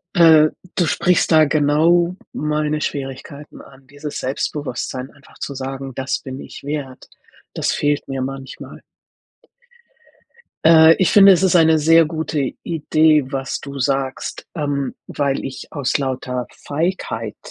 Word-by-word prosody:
Äh, 160 -3 +6 0.3
du 175 - +2
sprichst 180 +3 +1
da 160 -2 +6
genau 160 +4 +2 0.2
meine 150 0 -1
Schwierigkeiten 140 +1 -6
an. 135 0 -18
Dieses 145 +1 -7
Selbstbewusstsein 130 -1 -4
einfach 140 -1 -21
zu 140 - -5
sagen: 135 0 -6
„Das 130 +1 -2
bin 130 0 -8
ich - - -11
wert.“ 140 -3 -6 0.4
Das - - -1
fehlt 145 0 -1
mir 135 -1 -4
manchmal. 135 0 -7 1.8
Äh, 160 0 +7
ich 185 - +3
finde, 200 -1 +8
es 185 +1 +3
ist 185 -1 +3
eine 160 -1 +5
sehr 165 +2 +5
gute 155 -4 -2
Idee, 155 -2 +2
was 135 -1 -3
du 140 -1 -8
sagst, 135 0 -2
ähm, 145 -3 -2
weil 140 -2 -2
ich 135 -1 -7
aus 140 -4 -1
lauter 130 -2 -3
Feigheit 170 +6 -3
145 Hz, 135 wpm, -19 LUFS, 135-160 Hz, 1.8 s, finde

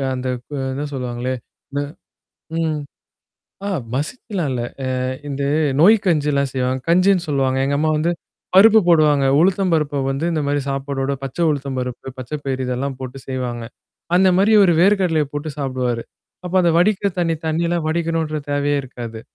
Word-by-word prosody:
அந்த 130 0 -4 0.2
கு 150 - -10 0.2
எதோ 145 +2 -3
சொல்லுவாங்களே? 125 0 -3 0.4
ம - - +2 0.8
ம். 155 -2 0 0.9
அ - - -1 0.2
மசிச்சலாம் 170 - -3
இல்ல. 120 -1 -2 0.2
அ - - -1 0.4
இந்த 140 0 -3 0.4
நொய் 210 +7 +7
கஞ்சில்லாம் 145 -5 +1
செய்வாங்க. 130 0 0
கஞ்சின்னு 185 0 +3
சொல்லுவாங்க. 135 -2 +1
எங்க 140 0 +1
அம்மா 155 +1 +2
வந்து 170 +3 +1 0.4
பருப்பு 220 +2 +8
போடுவாங்க. 150 -4 +4 0.2
உளுத்தம் 190 0 +2
பருப்பு 145 -2 0
வந்து 135 +4 -2
இந்த 155 - 0
மாரி 145 0 +1
சாப்பாடோட 135 0 -2
பச்சை 135 +6 -3
உழுத்தம் 140 -2 -3
பருப்பு, 125 +1 -6
பச்ச 130 +1 -8
பயர் 130 -1 -2
இதெல்லாம் 130 +2 -2
போட்டு 130 +1 -6
செய்வாங்க. 125 -3 -3 0.5
அந்த 190 0 +5
மாரி 210 +3 +4
இவரு 180 -4 +5
வேர்க் 195 +2 +4
கடலைய 160 -5 +1
போட்டு 150 +1 -3
சாப்பிடுவாரு. 130 -4 -2 0.4
அப்ப 180 +1 -5
அந்த 170 -1 +3
வடிக்கிற 200 +2 +2
தண்ணி 165 -2 +1
தண்ணீல்லாம் 170 0 0
வடிக்கணுன்ற 160 -2 -1
தேவையே 145 0 +1
இருக்காது. 120 -3 -8
145 Hz, 155 wpm, -20 LUFS, 130-170 Hz, 0.9 s, பருப்பு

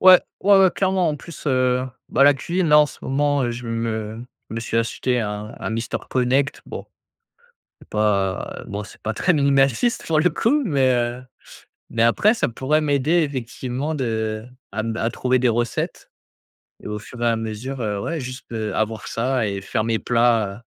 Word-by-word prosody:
Ouais, 185 -1 +9 0.2
ouais, 200 0 +6
ouais, 190 -2 +6
clairement 190 -3 +1
en 150 - -1
plus, 150 +2 -11
heu, 130 -1 +2 0.2
bah 140 - +3
la 145 0 +7
cuisine 170 +4 -1
là 150 - +7
en 150 - +4
ce - - -12
moment, 145 +1 +1
heu, 120 - 0
je 120 +1 -6
me 115 -1 -3 0.3
me 115 +1 -3
suis 115 - -3
acheté 120 +2 0
un 105 +1 -4
un - - -4
Mister 115 +1 -2
Connect 130 +3 +1
bon. - - -7 0.9
C'est - - -18
pas, 100 -3 0
bon 105 +1 -4
c'est - - -14
pas 110 - -3
très 180 - +2
minimaliste 140 - +2
pour 155 -2 +2
le 180 - +4
coup, 235 - +1
mais, 135 -7 +3
heu, 120 +1 -1 0.7
mais 115 - +1
après 200 - +4
ça - - 0
pourrait 135 +6 +1
m'aider 150 +3 +2
effectivement 130 +1 -3
de 110 -4 -2 0.3
à 110 - -2
m 110 0 -2
à 115 +1 0
trouver 130 +1 +1
des 125 0 +2
recettes. 120 +1 -2 0.7
Et - - -6
au 105 0 -4
fur 120 +3 -11
et - - +2
à 115 - +3
mesure, 115 +4 -5
heu, 105 -2 -1
ouais 165 +8 -3
juste, 130 -1 -8
heu, 110 -2 -3
avoir 110 0 -2
ça 125 -1 0
et 100 -1 -3
faire 110 +2 -1
mes 115 -1 0
plats 115 -3 +1
125 Hz, 190 wpm, -22 LUFS, 110-145 Hz, 0.9 s, Ouais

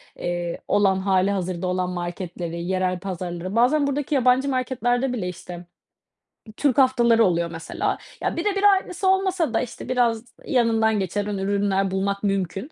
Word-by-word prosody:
eee, 175 -1 -3
olan 195 -2 +3
hâlihazırda 190 -2 0
olan 180 0 -1
marketleri 175 -1 -5
yerel 185 0 -1
pazarları, 180 0 -5
bazen 280 +5 +3
buradaki 285 +1 -1
yabancı 260 +1 +3
marketlerde 255 0 0
bile 195 -7 -3
işte 175 0 -9 0.9
Türk 280 -4 +1
haftaları 240 -4 +4
oluyor 170 -2 0
mesela. 165 -1 -3 0.2
Ya, - - -1
birebir 395 +3 0
aynısı 385 -2 +3
olmasa 380 - +1
da - - +2
işte, 245 - -7
biraz 240 -2 +1 0.2
yanından 225 -4 +2
geçen 195 +2 -2
ün 205 -1 -3
ürünler 195 0 0
bulmak 200 +1 -1
mümkün. 195 - -2
200 Hz, 140 wpm, -23 LUFS, 185-255 Hz, 0.9 s, haftaları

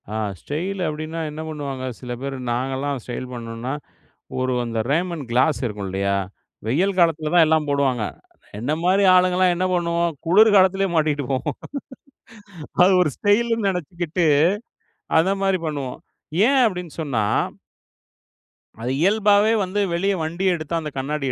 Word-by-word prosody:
ஆ - - -3 0.3
style 185 +7 -4
அப்டின்னா, 155 +2 -4
என்ன 155 +1 -6
பண்ணுவாங்க 140 -4 -5
சில 125 -1 -7
பேர் 135 0 -4 0.2
நாங்கலாம் 135 +3 -2
ஸ்டைல் 125 +1 -5
பண்ணணோம்னா, 115 +2 -5 0.7
ஒரு 130 0 0
அந்த 115 -1 -3
ரேமன் 170 0 -1
கிளாஸ் 130 +5 +2
இருக்கும் 105 -4 -4
இல்லையா, 100 +1 0 0.5
வெயில் 180 - +1
காலத்தில 160 -3 +2
தான் 170 -2 +7
எல்லாம் 155 -1 +2
போடுவாங்க. 135 -5 +1 0.5
என்னை 125 +8 -1
மாரி 190 +3 +3
ஆளுங்கலாம் 180 0 +4
என்ன 185 +2 0
பண்ணுவோம் 170 -1 +1
குளிர் 210 +6 +6
காலத்திலயே 195 0 +4
மாட்டிகிட்டு 150 -2 +1
போவோம். 135 +1 -1 1.3
அது 185 - +6
ஒரு 170 - +2
ஸ்டைல்னு 225 +1 +2
நெனைச்சுக்கிட்டு 175 -1 -2 0.9
அந்த 180 +4 +3
மாதிரி 195 -1 +2
பண்ணுவோம். 140 -5 -4 0.5
ஏன் 270 +1 +4
அப்டின்னு 180 -6 -4
சொன்னா 125 -8 -1 1.6
அது 125 +2 -2
இயல்பாவே 205 +3 +4
வந்து 190 +2 -2
வெளிய 195 +4 +1
வண்டியை 175 +4 0
எடுத்து 155 -1 -6
அந்த 155 -2 -5
கண்ணாடியை 135 0 -2
160 Hz, 135 wpm, -22 LUFS, 135-185 Hz, 1.6 s, தான்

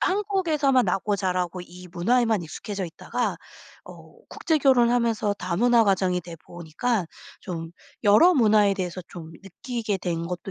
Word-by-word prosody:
한국에서만 340 - +1
나고 205 +1 -1
자라고 180 -2 -2
이 180 +1 -13
문화에만 220 +3 +1
익숙해져 195 +4 -6
있다가 165 - -3 0.5
어 - - -14
국제 320 -2 -1
결혼을 245 -4 +4
하면서 230 -3 +1
다문화 230 +7 +2
가정이 185 -2 +1
돼보니까 175 +5 -4 0.3
좀 165 -3 -6 0.3
여러 320 - +6
문화에 210 -5 +4
대해서 185 -1 -4
좀 165 -2 -10
느끼게 215 +2 -4
된 170 -2 -3
것도 180 +2 -6
200 Hz, 325 characters per minute, -24 LUFS, 180-245 Hz, 0.5 s, 여러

